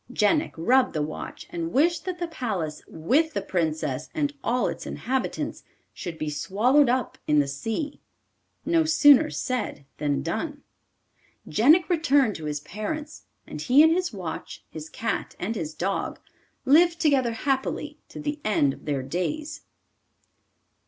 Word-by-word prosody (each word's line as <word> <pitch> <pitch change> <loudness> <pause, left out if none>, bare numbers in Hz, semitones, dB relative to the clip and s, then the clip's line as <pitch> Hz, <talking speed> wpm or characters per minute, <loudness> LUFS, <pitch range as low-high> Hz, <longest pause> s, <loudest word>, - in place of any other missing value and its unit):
Jenik 275 +8 +2
rubbed 250 +10 +3
the 155 - -1
watch 150 - -6
and 165 -1 -3
wished 330 +5 +2
that 365 -1 -3
the 350 -1 -3
palace, 200 - -3
with 285 - +1
the - - 0
Princess 160 -7 -2
and 295 -2 0
all 245 +1 +1
its - - -5
inhabitants, 260 +2 -3 0.3
should 170 -3 -6
be 155 - -3
swallowed 230 - +3
up 255 +1 -1
in 150 - +3
the 145 -1 +3
sea. 225 - -4 0.7
No 330 -1 +3
sooner 310 -1 +6
said 250 - -3
than 145 -2 0
done. 280 - -3 0.8
Jenik 310 +10 +5
returned 285 - +3
to 160 - -8
his 150 -1 -3
parents, 295 - -6 0.2
and - - -7
he 275 +4 +6
and 320 - +6
his 360 +1 +1
watch, 185 -6 -6
his 155 0 -8
cat 225 0 -3
and 220 +6 -3
his 160 -6 -4
dog, 195 +2 -2 0.5
lived 335 +4 +5
together 270 -7 +2
happily 265 +3 -2
to - - -9
the 295 0 -3
end 145 -10 +2
of - - -15
their 140 -3 -1
days. 185 - -3
245 Hz, 150 wpm, -26 LUFS, -, 0.8 s, sooner